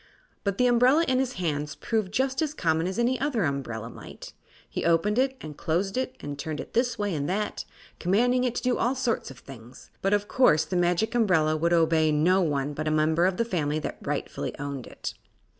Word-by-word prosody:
But 200 -1 -1
the 250 - +3
umbrella, 250 +7 +4
in 255 0 +2
his 260 -1 -1
hands, 150 -6 -2
proved 215 -5 -2
just 265 +5 0
as 305 -1 -1
common 160 - +1
as 190 - -4
any 245 +2 +1
other 265 -6 0
umbrella 130 -7 -3
might. 115 - -11 0.3
He - - -4
opened 170 +7 +2
it 265 0 +1
and 155 -1 -8
closed 180 +6 -1
it, 260 0 -2
and 145 -1 -6
turned 155 +1 -4
it - - -8
this 245 +1 +1
way 205 -2 -1
and 145 -1 -2
that, 210 +3 -2 0.3
commanding 245 +8 +2
it 245 -1 -1
to - - -3
do 250 -1 +1
all 250 +3 +1
sorts 255 -3 -1
of 135 - -11
things; 125 -1 -13
but 195 - +1
of 205 0 +1
course 160 - +4
the 185 - -4
Magic 175 +5 +1
Umbrella 180 -10 +3
would 170 +2 0
obey 160 -2 +3
no 175 +6 +3
one 145 -3 -1
but 155 +2 -4
a - - +3
member 155 +3 +3
of 185 -1 -1
the 230 - +1
family 155 -8 -1
that 155 - -5
rightfully - - -4
owned 140 -3 -5
it. - - -6
180 Hz, 215 wpm, -26 LUFS, 155-240 Hz, 0.3 s, umbrella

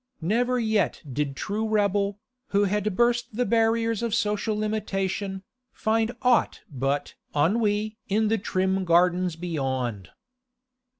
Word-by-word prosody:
Never 240 +8 +1
yet 220 -4 0
did 140 +1 -2
true 215 +6 -2
rebel, 200 -1 +1 0.3
who 200 +1 +2
has 205 +1 +1
burst 235 +3 +1
the 245 +2 +1
barriers 230 -1 +2
of 230 -2 0
social 210 -1 0
limitation, 195 -2 -2 0.3
find 225 +1 0
aught 250 -2 +3
but 135 +2 -1 0.2
ennui 210 +6 +1
in 215 +2 +2
the 225 +1 +1
trim 190 -1 0
gardens 175 0 +3
beyond. 130 - -3
205 Hz, 120 wpm, -26 LUFS, 180-225 Hz, 0.3 s, aught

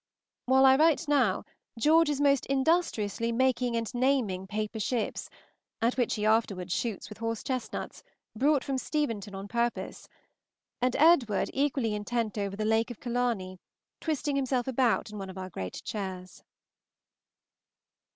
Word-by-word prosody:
While 265 +1 +5
I 265 0 +7
write 320 +1 +3
now, 260 -10 +2 0.3
George 315 +6 +4
is 290 -2 -1
most 280 -2 +3
industriously 265 - +1
making 250 0 +1
and 230 -1 -1
naming 240 -8 +1
paper 215 +2 -3
ships, 230 +1 -2 0.5
at 230 +2 +1
which 245 -3 +1
he 210 - -2
afterwards 200 -5 +1
shoots 225 -5 -3
with 210 - -11
horse 230 -1 -3
chestnuts, 255 -4 -4 0.3
brought 280 +3 +2
from 270 -1 -2
Steventon 230 -10 -2
on 195 +1 -6
purpose; 235 +2 -2 0.7
and 250 0 +1
Edward 275 - +4
equally 270 -5 0
intent 215 +1 -2
over 200 -1 -2
the 215 +1 -2
"Lake 220 +2 +2
of 240 - -8
Killarney," 235 -7 -2 0.4
twisting 295 -2 -1
himself 260 -2 0
about 245 -4 +1
in 210 - -7
one 195 -1 -6
of 190 - -9
our 185 0 -6
great 95 - -6
chairs. 190 -3 -6
235 Hz, 145 wpm, -29 LUFS, 210-265 Hz, 0.7 s, I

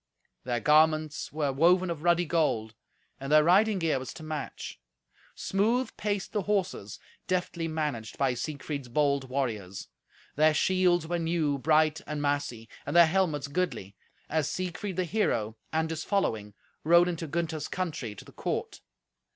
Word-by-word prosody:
Their 120 -1 0
garments 155 +2 +3
were 150 -2 -1
woven 175 +5 +4
of 160 -3 -5
ruddy 175 +1 +3
gold, 150 -10 0 0.5
and 135 +1 -5
their 155 0 +7
riding 200 +5 +4
gear 165 -6 +1
was 130 - -7
to 160 - -9
match. 155 - -6 0.6
Smooth 225 +5 0
paced 205 -2 -2
the 210 - +1
horses, 190 - -2 0.3
deftly 180 -2 -1
managed 150 -9 -3
by 135 -2 +2
Siegfried's 140 +1 -5
bold 140 +1 +1
warriors. 110 -8 -3 0.5
Their 155 +1 +4
shields 180 -1 +3
were 175 +1 -2
new, 160 -4 0
bright 155 +1 +3
and 150 0 -3
massy, 145 -6 -2 0.2
and - - -4
their 170 0 +9
helmets 160 -5 0
goodly, 140 - -3 0.3
as 155 -1 0
Siegfried 185 +1 -4
the 185 - +1
hero 115 - 0 0.2
and 160 0 +1
his 160 -1 -3
following 110 - -1 0.3
rode 170 +2 +6
into 170 -2 -3
Gunther's 160 0 -2
country 155 - -4
to - - -11
the - - -14
court. - - -4
155 Hz, 150 wpm, -28 LUFS, 140-175 Hz, 0.6 s, their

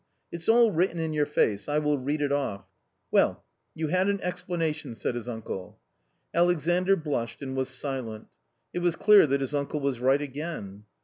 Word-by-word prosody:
It's 170 +2 -4
all 230 -1 +6
written 175 0 +1
in 160 -1 -2
your 150 -1 +1
face, 105 +5 +1
I 145 - +1
will 150 -1 +1
read 145 +3 -1
it 140 - 0
off. 130 -9 -1 0.5
Well, - - +3 0.3
you 160 -1 -2
had 185 +3 +2
an 200 0 0
explanation," 165 -7 -3
said 115 - -2
his 120 0 -5
uncle. 110 -5 -6 0.5
Alexandr 175 +2 +3
blushed 140 - -3
and 130 -1 -4
was 130 0 -1
silent. 130 -5 -4 0.5
It 175 - -1
was 175 -1 +1
clear 210 -4 +6
that 140 0 +1
his 135 +2 -3
uncle 145 +1 -1
was 140 -3 -1
right 135 +3 +3
again. 140 - -6
145 Hz, 180 wpm, -27 LUFS, 130-170 Hz, 0.5 s, all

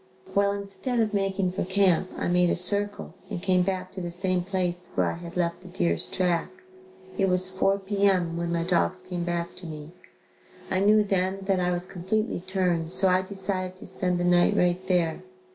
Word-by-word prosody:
Well, 200 0 +3
instead 200 +5 -2
of 215 -2 +1
making 195 -2 0
for 185 - -2
camp, 185 -1 +2
I - - -2
made 180 0 +3
a - - +1
circle 205 +3 +2 0.2
and 200 -5 -4
came 185 0 +2
back 185 0 -2
to 190 - -7
the 175 - -4
same 180 +1 0
place 180 -1 -2
where - - +1
I - - -6
had 170 0 -9
left 170 0 -1
the 185 - -13
deer's 85 - +1
track. 175 -3 0 0.7
It 195 - +3
was 180 0 +3
4 190 +1 +1
P. 200 +1 0
M., 175 -3 0
when 170 0 -2
my 170 -1 0
dogs 180 +1 0
came 180 -2 -3
back 170 0 -3
to 180 - -5
me. 155 0 -8 0.8
I 185 - +1
knew 210 +2 +5
then 195 -1 -1
that 190 -1 +1
I 180 0 +1
was 175 0 -2
completely 190 +4 -2
turned 180 -3 -1
so 190 - +5
I 185 0 +3
decided 185 -1 -1
to 185 - -11
spend 180 -1 -1
the - - 0
night 175 0 +3
right 180 +1 +1
there. 175 -3 +1
185 Hz, 205 wpm, -26 LUFS, 175-195 Hz, 0.8 s, knew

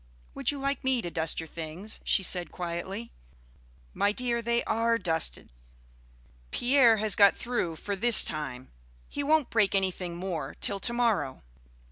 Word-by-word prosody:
"Would - - -1
you 290 - -1
like 275 +1 -3
me 260 -1 +1
to 175 - -5
dust 160 -1 -1
your 165 - -5
things?" 165 +6 -7
she 195 - +1
said 180 -1 +3
quietly. 180 +6 -6 0.8
"My 205 - +1
dear, 235 +1 -2
they 235 +1 -1
are 230 +1 0
dusted. 165 -6 0 1.0
Pierre 245 - +3
has 215 -2 +1
got 200 -1 +5
through 235 -9 -3
for 200 +5 -5
this 235 +3 +8
time. 135 -5 -5 0.4
He - - -4
won't 300 -1 +1
break 210 -3 +1
anything 185 -2 -2
more 170 -6 -5
till 200 - +1
to 235 - 0
morrow." 230 - -1
200 Hz, 155 wpm, -27 LUFS, 170-235 Hz, 1.0 s, this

